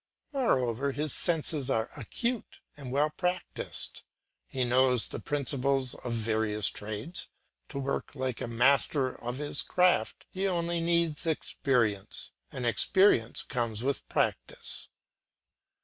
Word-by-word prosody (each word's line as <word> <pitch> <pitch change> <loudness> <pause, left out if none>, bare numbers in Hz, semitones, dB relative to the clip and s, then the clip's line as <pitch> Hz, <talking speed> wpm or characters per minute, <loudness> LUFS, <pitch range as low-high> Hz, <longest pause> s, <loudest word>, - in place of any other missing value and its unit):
Moreover 135 - +1
his 150 0 -1
senses 155 -5 +1
are 115 -3 0
acute 235 - -3 0.2
and 135 -4 -7
well 145 +3 +2
practised, 180 +2 -2 0.5
he 130 - -1
knows 125 -1 +3
the - - -6
principles 140 -2 0
of - - -13
the 115 - -2
various 110 -2 +2
trades; 110 - -5 0.4
to 145 - -6
work 140 +1 -2
like 130 -3 -2
a - - -2
master 130 +3 +3
of 120 +1 -3
his 145 0 0
craft 180 0 +2
he 195 0 0
only 170 -2 0
needs 170 -1 +2
experience, 120 -9 0 0.2
and 125 - -4
experience 120 - +3
comes 115 -3 -1
with 140 0 -2
practice. - - -2
135 Hz, 125 wpm, -30 LUFS, 120-160 Hz, 0.5 s, knows